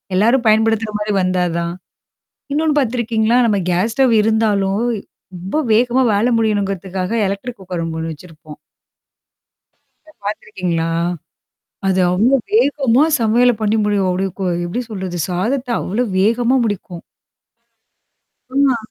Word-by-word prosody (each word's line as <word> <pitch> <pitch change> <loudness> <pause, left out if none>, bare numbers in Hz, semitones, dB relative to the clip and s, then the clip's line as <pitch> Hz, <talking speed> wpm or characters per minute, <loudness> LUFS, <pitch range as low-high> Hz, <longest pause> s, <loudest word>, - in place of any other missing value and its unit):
எல்லாரும் 235 +5 +3
பயன்படுத்துற 220 0 +2
மாரி 210 0 -2
வந்தாதான்? 175 -2 -1 0.8
இன்னொன்னு 300 0 +1
பாத்திருக்கீங்களா? 235 -1 +1
நம்ம 205 -3 +1
கேஸ் 200 +6 0
ஸ்டவ் 260 -3 +3
இருந்தாலும், 210 -2 +1 0.5
ரொம்ப 190 - -2
வேகமா 245 +3 +3
வேல 205 +4 +2
முடியணுங்கிறதுக்காக 195 -3 -1 0.2
எலக்ட்ரிக் 215 +4 -5
குக்கர் 180 -2 -5
அங்க 160 0 -4
1 160 0 -3
வச்சிருப்போம். 155 -2 -14 1.7
பாத்துருக்கீங்களா? 175 -5 -2 1.0
அது 190 0 +2
அவ்ளோ 225 +9 +3 0.2
வேகமா 285 - +3 0.2
சமையல 235 +2 +4
பண்ணி 215 +1 +1
முடியும். 205 -2 +1
அப்படிய 190 +2 -1
கொ 190 - -1 0.2
எப்படி 210 +9 -3
சொல்றது? 190 -4 -5
சாதத்த 240 +9 -1
அவ்ளோ 215 +7 -1 0.2
வேகமா 235 +5 +2
முடிக்கும். 185 -4 -5 1.5
ஆமா. 275 -3 +3
210 Hz, 110 wpm, -18 LUFS, 185-235 Hz, 1.7 s, சமையல